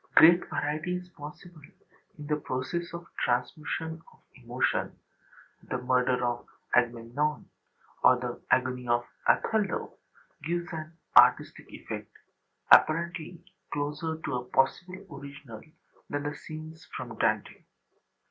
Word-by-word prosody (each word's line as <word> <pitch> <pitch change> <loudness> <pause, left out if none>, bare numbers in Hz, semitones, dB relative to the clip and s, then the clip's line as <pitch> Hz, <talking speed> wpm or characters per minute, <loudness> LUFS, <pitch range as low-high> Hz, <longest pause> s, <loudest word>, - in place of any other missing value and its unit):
Great 170 +2 +8
variety 155 +4 -1
is 180 0 -6
possible 155 +1 -11 0.6
in 150 - -8
the 150 +1 +1
process 150 +5 -3
of 170 0 -7 0.2
transmution 160 +6 -1
of - - -22
emotion: - - -1 0.6
the - - -3
murder 125 0 +2
of 120 0 -2 0.3
Agamemnon, 120 +5 +1 0.6
or 130 - +8
the 125 -1 -5
agony 125 -1 +1
of 120 0 +2 0.2
Othello, 210 -4 +1 0.4
gives 175 +2 -2
an 155 0 -6 0.2
artistic - - +6
effect - - -7 0.6
apparently 170 +1 +4 0.3
closer 150 +2 -2
to 150 - -1
a 125 - -4
possible 180 +10 0
original 140 -5 -10 0.5
than 145 0 -2
the 145 0 -2
scenes 155 +1 -9
from - - -6
Dante. - - 0
150 Hz, 115 wpm, -29 LUFS, 125-165 Hz, 0.6 s, Great